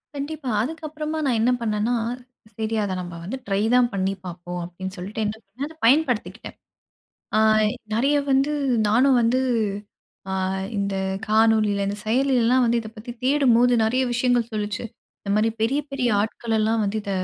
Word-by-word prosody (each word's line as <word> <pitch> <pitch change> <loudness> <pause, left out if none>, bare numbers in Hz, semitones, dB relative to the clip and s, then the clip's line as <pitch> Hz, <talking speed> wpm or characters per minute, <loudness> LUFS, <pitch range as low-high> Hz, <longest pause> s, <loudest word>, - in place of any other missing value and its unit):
கண்டிப்பா. 285 -1 -4
அதுக்கப்புறமா 310 +3 -4
நான் 245 -4 +2
என்ன 240 +3 +3
பண்ணண்னா, 215 +1 0 0.6
"சரி 220 0 -2
அத 195 -2 -2
நம்ம 175 -1 -7
வந்து 215 +10 -4
ட்ரை 195 0 +1
தான் 250 -1 +4
பண்ணி 195 0 0
பாப்போம்" 175 0 -6
அப்பிடின்னு 185 +2 -7
சொல்ட்டு 205 +5 -4
என்ன 210 +1 -2
பண்ணேன், 230 +8 -6
அத 320 - -14
பயன்படுத்திக்கிட்டேன். 250 -3 +1 0.8
ஆ - - +4 0.6
நெறைய 275 +6 +2 0.2
வந்து 270 +3 +2 0.4
நானும் 250 +4 +4
வந்து 240 +3 +2 0.9
ஆ - - -2 0.4
இந்த 200 -1 -1 0.3
காணொலியில, 215 -2 +3
இந்த 200 - -3
செயலியில 250 +2 +2
எல்லாம் 255 +2 +4
வந்து 235 0 +2
இத 220 - -8
பத்தி 220 +2 -9
தேடும்போது, 250 -3 +4
நெறைய 245 +4 +2
விஷயங்கள் 240 -1 +1
சொல்லுச்சு. 210 0 -3 0.4
இந்தமாரி 210 +2 +1
பெரிய 270 +6 +2
பெரிய 265 -3 0
ஆட்கள் 225 +2 -2
எல்லாம் 220 +1 +1
வந்து 200 +2 -2
இத 200 - -5
230 Hz, 155 wpm, -23 LUFS, 205-260 Hz, 0.9 s, தான்